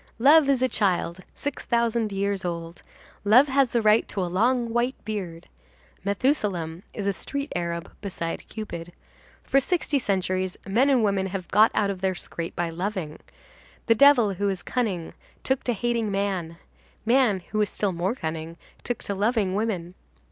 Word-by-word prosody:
Love 285 +4 +6
is 260 -2 +3
a - - +4
child 185 -6 0 0.2
six 285 -1 -4
thousand 235 -2 +1
years 200 0 -1
old. 170 -1 -5 0.4
Love 235 +7 +6
has 270 -1 +3
the 235 -1 0
right 215 +1 +4
to - - -5
a 185 - +1
long 230 +6 +1
white 240 +2 +1
beard. 180 -6 -5 0.6
Methusalem 200 - 0
is 205 - -5
a 200 - +1
street 280 +7 -4
arab 170 -1 -3
beside 175 -4 -4
Cupid. 175 -6 -7 0.5
For 275 - +3
sixty 300 -1 0
centuries 185 -4 -1
men 240 +8 +3
and 255 -5 +4
women 195 -2 +1
have 185 -2 -5
got 215 +3 +6
out 200 -1 +2
of 185 -2 -7
their 190 -1 0
scrape 170 -1 -6
by 170 -1 -1
loving. 175 -3 -4 0.7
The 230 - +5
devil, 240 -4 +6
who 200 +2 0
is 190 -2 -3
cunning, 200 -10 -2 0.3
took 265 -1 0
to 245 - +1
hating 230 0 -1
man; 195 -4 -2 0.5
man, 235 -5 +3
who 215 - +1
is 210 - +1
still 205 -2 -1
more 180 +6 -1
cunning, 160 -2 -5 0.3
took 245 - -3
to 200 - -2
loving 205 -1 +1
woman. 190 -5 -2
200 Hz, 170 wpm, -25 LUFS, 180-235 Hz, 0.7 s, Love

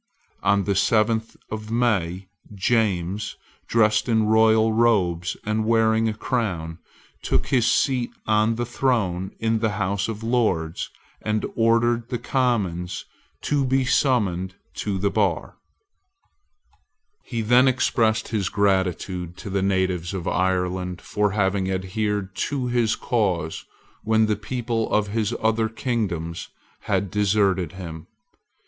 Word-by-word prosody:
On 100 0 +2
the 100 - 0
seventh 110 +3 +1
of 110 0 -5
May, 100 -6 0 0.3
James, 100 -2 0 0.3
dressed 110 0 +2
in 110 -1 +3
royal 110 0 +4
robes 95 -7 +2
and 110 +1 0
wearing 110 0 +3
a - - -2
crown, 95 -9 -2 0.4
took - - 0
his 120 -3 +3
seat 125 0 +1 0.2
on 110 +1 +2
the 120 +1 -2
throne 110 -8 0
in 115 0 0
the 110 -1 0
House 100 0 -1
of 110 -1 -5
Lords, 105 -9 0 0.3
and 110 0 -1
ordered 115 +1 +2
the 120 - -1
Commons 105 -9 -1 0.4
to 145 -2 +1
be 130 0 +1
summoned 95 -9 +1 0.2
to 100 -2 -2
the 100 +1 0
bar, - - 0 1.7
He 115 -3 -3
then 120 +4 +5
expressed 115 -4 +1
his 105 -5 -1
gratitude 95 -3 0
to 100 - -7
the 100 0 0
natives 95 -2 0
of 90 -3 -4
Ireland 90 -1 0
for 105 -1 0
having 95 -2 +1
adhered 95 +1 -2
to 140 -3 -2
his 120 -2 +1
cause 90 -9 -1 0.4
when 110 0 +3
the 110 -1 +1
people 115 +1 -3
of 105 -1 +1
his 110 +2 -1
other 110 0 +2
kingdoms 95 -9 -3 0.4
had 100 - 0
deserted 100 -4 +1
him. 85 -4 -8
105 Hz, 130 wpm, -23 LUFS, 95-115 Hz, 1.7 s, then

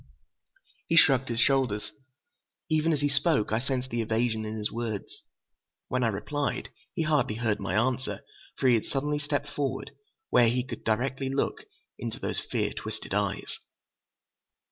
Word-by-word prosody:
He 165 - +2
shrugged 135 -5 +6
his 115 -1 0
shoulders. 120 -7 +2 0.8
Even 155 +1 +3
as 150 -3 +1
he 145 - +3
spoke, 140 -5 +2
I 110 - +2
sensed 130 0 -2
the 120 0 0
evasion 110 0 0
in 110 +1 -4
his 105 -1 -2
words. 115 -3 -4 0.7
When 125 0 +1
I - - +4
replied, 125 +8 -2 0.3
he 165 - +1
hardly 150 -8 +2
heard 110 -2 0
my - - -2
answer, 130 +3 0 0.4
for 135 - +2
he 125 - +7
had 115 - +2
suddenly 145 +2 -1
stepped 145 -1 -1
forward, 135 -1 -2 0.4
where 120 -2 +6
he 125 +2 +1
could 130 - -6
look - - -28
directly 130 +5 0 0.7
into - - -4
those - - -2
fear - - -1
twisted - - -5
eyes. - - -1
130 Hz, 160 wpm, -28 LUFS, 115-140 Hz, 0.8 s, he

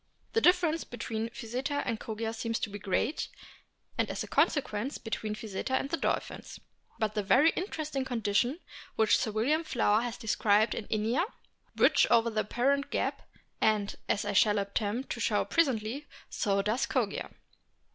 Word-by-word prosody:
The 455 - +3
difference 350 -4 +4
between 225 -1 -4
Physeter 255 +5 -3
and 230 -3 -2
Kogia 225 0 -4
seems 230 0 -2
to 205 - -2
be 205 - -6
great, 205 - -1 0.7
and - - +1
as - - -3
a - - -8
consequence 265 -2 +1
between 220 -1 -4
Physeter 215 +4 -3
and 275 - -1
the 335 - +1
dolphins. - - -3 0.4
But 215 -1 0
the 210 - 0
very 260 +11 +5
interesting 310 -7 -3
conditions 240 +2 0 0.4
which 220 -1 +4
Sir - - 0
William 255 +10 +1
Flower 225 -7 +2
has 240 -1 -4
described 215 -1 +2
in 215 - -5
Inia 225 - +1 0.5
bridge - - +5
over 230 -1 +4
the 215 -1 +1
apparent 270 +6 +1
gap, - - -2 0.3
and, 210 -2 +2
as 205 - +1
I 205 - -1
shall 210 +1 +4
attempt 205 +5 -2
to - - -3
show - - +1
presently, 270 -3 0 0.2
so 200 -3 +1
does 220 +5 0
Kogia. - - -1
225 Hz, 160 wpm, -30 LUFS, 215-275 Hz, 0.7 s, very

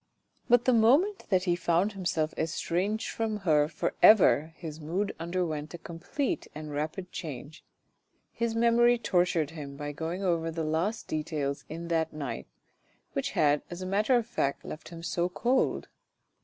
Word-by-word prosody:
But 245 0 +5
the 255 - +4
moment 280 - +3
that 185 -3 +3
he 175 -2 +2
found 175 +4 +1
himself 170 -5 -1
estranged 180 +6 -1
from 220 -2 -2
her 150 -3 +4
for 155 0 -2
ever 170 -7 +6
his 160 -2 -7
mood 180 +7 -2
underwent 165 -2 -2
a - - -6
complete 260 - -3
and 155 0 -6
rapid 155 +5 -4
change. 150 -1 -7 0.7
His 230 -1 -2
memory 235 +1 +4
tortured 175 -8 +1
him 145 -4 -8
by 145 0 -4
going 165 +6 -4
over 170 -3 +1
the 165 0 -3
least 165 +8 -1
details 150 -2 -2
in 165 +2 -6
that 160 -1 0
night, 145 -4 -5 0.7
which - - -2
had 145 -1 +4
as 175 +1 -6
a - - -4
matter 210 +7 +2
of 240 -2 +2
fact 140 - -2
left 155 - -8
him 165 -1 -9
so 175 +1 0
cold. 245 +8 +1
170 Hz, 160 wpm, -29 LUFS, 155-210 Hz, 0.7 s, ever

